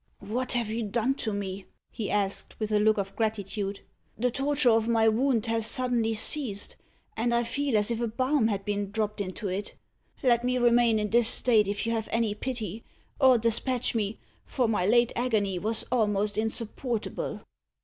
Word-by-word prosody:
"What 250 Hz, +6 st, -1 dB
have 235 Hz, -3 st, -1 dB
you 230 Hz, +1 st, -2 dB
done 235 Hz, +4 st, 0 dB
to 220 Hz, -, -2 dB
me?" 195 Hz, -1 st, -4 dB, 0.3 s
he 220 Hz, -4 st, -4 dB
asked, 200 Hz, -1 st, -2 dB
with 215 Hz, -1 st, -2 dB
a 210 Hz, -, +3 dB
look 215 Hz, +1 st, +3 dB
of 195 Hz, -1 st, -3 dB
gratitude; 205 Hz, -2 st, -2 dB, 0.4 s
"the 250 Hz, +2 st, +1 dB
torture 270 Hz, 0 st, +2 dB
of 225 Hz, 0 st, +2 dB
my 225 Hz, -1 st, +3 dB
wound 230 Hz, +1 st, +2 dB
has 225 Hz, -1 st, +1 dB
suddenly 235 Hz, -3 st, +1 dB
ceased, 215 Hz, -3 st, 0 dB, 0.4 s
and 230 Hz, +2 st, 0 dB
I 235 Hz, -, +2 dB
feel 270 Hz, 0 st, 0 dB
as 210 Hz, +2 st, +1 dB
if 230 Hz, 0 st, -2 dB
a 235 Hz, -, 0 dB
balm 255 Hz, +2 st, +1 dB
had 200 Hz, -3 st, -2 dB
been 205 Hz, -1 st, -2 dB
dropped 210 Hz, 0 st, -2 dB
into 195 Hz, +1 st, -4 dB
it. 195 Hz, +2 st, -4 dB, 0.5 s
Let 240 Hz, -2 st, +3 dB
me 250 Hz, 0 st, +1 dB
remain 240 Hz, -2 st, +4 dB
in 210 Hz, -1 st, -2 dB
this 235 Hz, 0 st, +4 dB
state 220 Hz, -5 st, +3 dB
if 205 Hz, +3 st, -2 dB
you 230 Hz, -, 0 dB
have 225 Hz, -1 st, -2 dB
any 230 Hz, -2 st, +1 dB
pity 220 Hz, -2 st, -5 dB, 0.4 s
or 260 Hz, -3 st, +6 dB
despatch 235 Hz, +2 st, 0 dB
me, 215 Hz, -2 st, -1 dB, 0.3 s
for 250 Hz, -4 st, -1 dB
my 205 Hz, -5 st, 0 dB
late 240 Hz, +2 st, +4 dB
agony 210 Hz, -7 st, 0 dB
was 220 Hz, +4 st, 0 dB
almost 210 Hz, -4 st, +1 dB
insupportable." 225 Hz, +1 st, -2 dB
225 Hz, 180 wpm, -27 LUFS, 210-240 Hz, 0.5 s, or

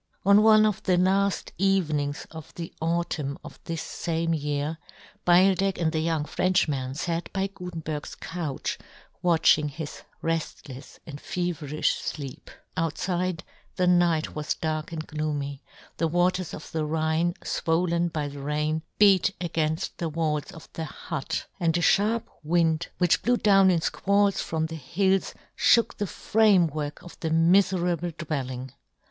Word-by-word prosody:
On 200 Hz, +1 st, +7 dB
one 215 Hz, 0 st, +6 dB
of 210 Hz, -3 st, 0 dB
the 180 Hz, -1 st, +2 dB
laft 195 Hz, +1 st, +1 dB
evenings 155 Hz, -7 st, +1 dB
of 160 Hz, -2 st, -10 dB
the 165 Hz, -1 st, -6 dB
autumn 160 Hz, -4 st, -1 dB
of -, -, -11 dB
this 165 Hz, -1 st, -3 dB, 0.2 s
fame 165 Hz, 0 st, 0 dB
year, 150 Hz, +1 st, -2 dB, 0.5 s
Beildech 190 Hz, +2 st, +4 dB
and 165 Hz, -2 st, +1 dB
the 160 Hz, -, -1 dB
young 160 Hz, -2 st, 0 dB
Frenchman 150 Hz, -8 st, 0 dB
fat 165 Hz, +2 st, -2 dB
by 195 Hz, -1 st, 0 dB
Gutenberg's 165 Hz, -6 st, -6 dB
couch 165 Hz, -6 st, -4 dB, 0.4 s
watching 160 Hz, -3 st, +4 dB
his 150 Hz, +1 st, -7 dB, 0.2 s
reftlefs 150 Hz, -4 st, -4 dB
and 145 Hz, -4 st, -8 dB
feverifh 160 Hz, -5 st, -1 dB
fleep 140 Hz, -4 st, -6 dB, 0.3 s
Outfide, 175 Hz, +2 st, -1 dB, 0.3 s
the 180 Hz, -, +1 dB
night 175 Hz, -3 st, +3 dB
was 150 Hz, -1 st, -2 dB
dark 155 Hz, -1 st, -3 dB
and 160 Hz, -1 st, -5 dB
gloomy; 145 Hz, -3 st, -3 dB, 0.4 s
the 165 Hz, -, +1 dB
waters 175 Hz, +1 st, +1 dB
of 150 Hz, -, -10 dB
the 160 Hz, -1 st, -1 dB
Rhine, 160 Hz, +2 st, 0 dB
fwollen 170 Hz, +1 st, 0 dB
by 150 Hz, -2 st, -2 dB
the 145 Hz, 0 st, -8 dB
rain, 150 Hz, +2 st, -1 dB, 0.2 s
beat 195 Hz, -2 st, +5 dB
againft 160 Hz, -2 st, -1 dB
the 170 Hz, -, -2 dB
walls 155 Hz, 0 st, -1 dB
of 165 Hz, -5 st, -12 dB
the 160 Hz, -, -4 dB
hut, 155 Hz, -2 st, -4 dB
and 165 Hz, -2 st, +2 dB
a -, -, 0 dB
{harp 215 Hz, +6 st, +2 dB
wind 165 Hz, +1 st, +1 dB
which 180 Hz, -2 st, +3 dB
blew 245 Hz, +1 st, +2 dB
down 195 Hz, -3 st, +5 dB
in 170 Hz, -3 st, +2 dB
fqualls 200 Hz, +3 st, +2 dB
from 160 Hz, -1 st, -1 dB
the 160 Hz, -, -6 dB
hills 190 Hz, +7 st, 0 dB, 0.2 s
fhook 235 Hz, -, +4 dB
the 205 Hz, -, -2 dB
framework 170 Hz, -10 st, +2 dB
of 175 Hz, -, -13 dB
the 160 Hz, -, -2 dB
miferable 175 Hz, 0 st, +2 dB
dwell 150 Hz, -5 st, -3 dB
ing. 130 Hz, 0 st, -7 dB
165 Hz, 145 wpm, -26 LUFS, 155-180 Hz, 0.5 s, On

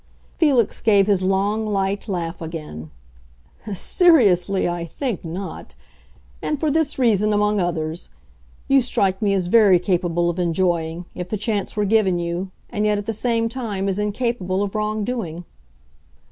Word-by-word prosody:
Felix 270 Hz, -, +2 dB
gave 200 Hz, -3 st, +4 dB
his 200 Hz, -2 st, +2 dB
long, 195 Hz, +3 st, +1 dB
light 200 Hz, 0 st, -1 dB
laugh 175 Hz, -4 st, -4 dB
again. 155 Hz, -, -7 dB, 0.8 s
"Seriously, 200 Hz, -, +3 dB
I 175 Hz, -1 st, -2 dB
think 225 Hz, -, -4 dB
not. 180 Hz, +4 st, -7 dB, 0.7 s
And 300 Hz, -, -2 dB
for 310 Hz, -1 st, +1 dB
this 315 Hz, -1 st, 0 dB
reason, 215 Hz, -5 st, +2 dB
among 210 Hz, 0 st, +2 dB
others: 165 Hz, -1 st, -3 dB, 0.6 s
you 275 Hz, 0 st, +5 dB
strike 195 Hz, -6 st, 0 dB
me 200 Hz, -2 st, +2 dB
as 185 Hz, -2 st, 0 dB
very 200 Hz, -1 st, +5 dB
capable 175 Hz, -2 st, 0 dB
of 175 Hz, +1 st, -2 dB
enjoying, 170 Hz, -1 st, 0 dB
if 180 Hz, 0 st, -6 dB
the 215 Hz, -, -2 dB
chance 210 Hz, -1 st, -2 dB
were 210 Hz, -1 st, +1 dB
given 200 Hz, -3 st, +2 dB
you, 175 Hz, +2 st, -3 dB, 0.2 s
and 210 Hz, -2 st, 0 dB
yet 210 Hz, 0 st, +2 dB
at 205 Hz, -, -4 dB
the 225 Hz, -, -2 dB
same 230 Hz, +1 st, 0 dB
time 225 Hz, -5 st, -3 dB
as 195 Hz, +1 st, -1 dB
incapable 210 Hz, -3 st, -1 dB
of 200 Hz, -, -4 dB
wrong 215 Hz, 0 st, -1 dB
doing." 180 Hz, -8 st, -4 dB
200 Hz, 155 wpm, -21 LUFS, 175-220 Hz, 0.8 s, you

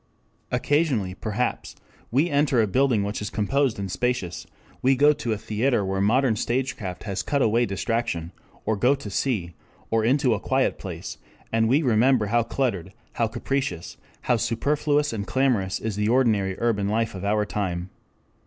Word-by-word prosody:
Occasionally 140 Hz, -, +1 dB
perhaps 110 Hz, +5 st, -3 dB, 0.3 s
we 140 Hz, +8 st, +2 dB
enter 145 Hz, -4 st, +2 dB
a 110 Hz, -, +4 dB
building 120 Hz, 0 st, +2 dB
which 105 Hz, +1 st, -3 dB
is 105 Hz, -, -3 dB
composed 135 Hz, +4 st, 0 dB
and 100 Hz, -2 st, -4 dB
spacious; 125 Hz, -6 st, -2 dB, 0.3 s
we 135 Hz, +1 st, +4 dB
go 145 Hz, +3 st, +5 dB
to 125 Hz, -5 st, -4 dB
a 110 Hz, -, 0 dB
theatre 110 Hz, +1 st, 0 dB
where 95 Hz, 0 st, -1 dB
modern 120 Hz, +3 st, +3 dB
stagecraft 115 Hz, -6 st, -2 dB
has 100 Hz, -3 st, -3 dB
cut 140 Hz, -2 st, 0 dB
away 115 Hz, +2 st, +2 dB
distraction, 100 Hz, -4 st, -2 dB, 0.3 s
or 110 Hz, -, +1 dB
go 125 Hz, +7 st, +3 dB
to 120 Hz, -7 st, -8 dB
sea, 95 Hz, -7 st, -1 dB, 0.4 s
or 115 Hz, -1 st, +2 dB
into 130 Hz, +1 st, +3 dB
a 105 Hz, -, -1 dB
quiet -, -, 0 dB
place, -, -, -7 dB, 0.3 s
and 115 Hz, 0 st, +3 dB
we 145 Hz, +6 st, +3 dB
remember 120 Hz, -1 st, +3 dB
how 120 Hz, -, +5 dB
cluttered, 115 Hz, -7 st, -2 dB, 0.2 s
how 115 Hz, -, +1 dB
capricious, 110 Hz, -8 st, -3 dB, 0.2 s
how 120 Hz, -, +2 dB
superfluous 145 Hz, +5 st, 0 dB
and 100 Hz, -3 st, -4 dB
clamorous 120 Hz, -8 st, +1 dB
is 110 Hz, -2 st, -3 dB
the 105 Hz, +1 st, +1 dB
ordinary 110 Hz, -7 st, +2 dB
urban 105 Hz, -4 st, +1 dB
life 115 Hz, +2 st, 0 dB
of 95 Hz, -1 st, -7 dB
our 105 Hz, +1 st, +1 dB
time. 95 Hz, -3 st, -3 dB
115 Hz, 165 wpm, -25 LUFS, 100-130 Hz, 0.4 s, go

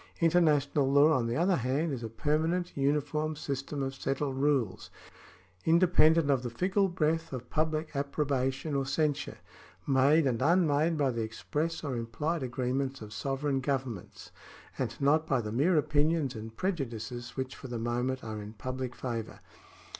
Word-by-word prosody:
International 150 Hz, -5 st, +3 dB
law, 145 Hz, +3 st, +6 dB
on 125 Hz, -5 st, +1 dB
the 115 Hz, -, -1 dB
other 175 Hz, +5 st, +2 dB
hand, 140 Hz, +6 st, 0 dB
is 125 Hz, -, -4 dB
a 115 Hz, -, -4 dB
permanent, 160 Hz, +9 st, 0 dB
uniform 150 Hz, +2 st, 0 dB
system 140 Hz, 0 st, -4 dB
of 135 Hz, 0 st, -3 dB
settled 135 Hz, 0 st, -2 dB
rules, 135 Hz, -8 st, 0 dB, 0.7 s
independent 165 Hz, -3 st, +4 dB
of 135 Hz, -3 st, +2 dB
the 125 Hz, -, -4 dB
fickle 190 Hz, -, +1 dB
breath 165 Hz, -1 st, 0 dB
of 125 Hz, -2 st, -7 dB
public 155 Hz, 0 st, -1 dB
approbation 140 Hz, 0 st, -1 dB
or 140 Hz, -1 st, +1 dB
censure 145 Hz, +2 st, -1 dB, 0.3 s
— -, -, -24 dB
made 140 Hz, +3 st, +4 dB
and 120 Hz, -4 st, +1 dB
vmmade 160 Hz, 0 st, +3 dB
by 140 Hz, -3 st, +2 dB
the 115 Hz, -1 st, -2 dB
express 150 Hz, +10 st, -3 dB
or 140 Hz, -4 st, -2 dB
implied 130 Hz, +8 st, -2 dB
agreements 130 Hz, +2 st, -2 dB
of 105 Hz, -1 st, -9 dB
sovereign 135 Hz, 0 st, -1 dB
governments, 130 Hz, -7 st, -4 dB, 0.4 s
and 120 Hz, -2 st, -3 dB
not 155 Hz, +3 st, +3 dB
by 135 Hz, -5 st, +2 dB
the 105 Hz, -2 st, -4 dB
mere 155 Hz, +9 st, +3 dB
opinions 150 Hz, -1 st, +1 dB
and 110 Hz, 0 st, -8 dB
prejudices 120 Hz, -, -4 dB
which 130 Hz, 0 st, -3 dB
for 130 Hz, -, -9 dB
the 120 Hz, -1 st, -4 dB
moment 120 Hz, +3 st, -1 dB
are 110 Hz, -1 st, -5 dB
in 105 Hz, +1 st, -8 dB
public 130 Hz, +2 st, -5 dB
favour. 115 Hz, -3 st, -5 dB
140 Hz, 160 wpm, -30 LUFS, 125-155 Hz, 0.7 s, law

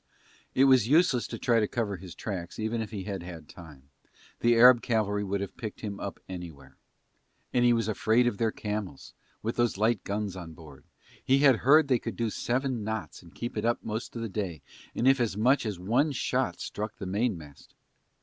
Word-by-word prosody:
It 130 Hz, -, +5 dB
was 130 Hz, -5 st, +5 dB
useless 145 Hz, -4 st, +3 dB
to -, -, -6 dB
try 120 Hz, -2 st, +2 dB
to 105 Hz, -, +1 dB
cover 105 Hz, -4 st, -2 dB
his 90 Hz, -2 st, -11 dB
tracks 90 Hz, -5 st, -5 dB
even 110 Hz, +1 st, -2 dB
if 110 Hz, -, -5 dB
he 100 Hz, -4 st, -5 dB
had 100 Hz, -2 st, -4 dB
had 85 Hz, -2 st, -9 dB
time, 75 Hz, -5 st, -14 dB, 0.5 s
the 120 Hz, 0 st, +4 dB
Arab 120 Hz, +1 st, +8 dB
cavalry 105 Hz, -3 st, 0 dB
could 100 Hz, 0 st, -2 dB
have 100 Hz, -, -6 dB
picked 110 Hz, -4 st, -7 dB
them 100 Hz, -2 st, -5 dB
up 100 Hz, -, -6 dB
anywhere. 80 Hz, -8 st, -9 dB, 0.8 s
And 125 Hz, -, +3 dB
he 120 Hz, -, +5 dB
was 115 Hz, -2 st, +1 dB
afraid 110 Hz, +3 st, +2 dB
of 120 Hz, -5 st, -1 dB
their 115 Hz, -1 st, +1 dB
camels 105 Hz, -10 st, -5 dB, 0.3 s
with 115 Hz, +2 st, -3 dB
those 120 Hz, -4 st, +1 dB
light 110 Hz, 0 st, +1 dB
guns 100 Hz, -1 st, -3 dB
on 85 Hz, -3 st, -8 dB
board, 80 Hz, -4 st, -14 dB, 0.4 s
he 135 Hz, -, +3 dB
had 135 Hz, -4 st, +6 dB
heard 145 Hz, +5 st, +5 dB
they 125 Hz, -3 st, +2 dB
could -, -, -5 dB
do 115 Hz, -2 st, -1 dB
seven 125 Hz, -1 st, -1 dB
knots 110 Hz, +1 st, -5 dB
and 85 Hz, -2 st, -17 dB
keep 120 Hz, -, -5 dB
it -, -, -2 dB
up 120 Hz, +1 st, 0 dB
most 110 Hz, +2 st, -5 dB
of 115 Hz, -, -4 dB
the -, -, -2 dB
day 95 Hz, -8 st, -4 dB, 0.3 s
and 120 Hz, -, +1 dB
if 135 Hz, 0 st, +5 dB
as 115 Hz, -5 st, 0 dB
much 125 Hz, +2 st, +3 dB
as 105 Hz, -4 st, -3 dB
one 120 Hz, -, +1 dB
shot 125 Hz, -, -1 dB
struck 105 Hz, +1 st, -5 dB
the 100 Hz, -, -7 dB
mainmast... 95 Hz, -, -3 dB
110 Hz, 205 wpm, -28 LUFS, 95-120 Hz, 0.8 s, Arab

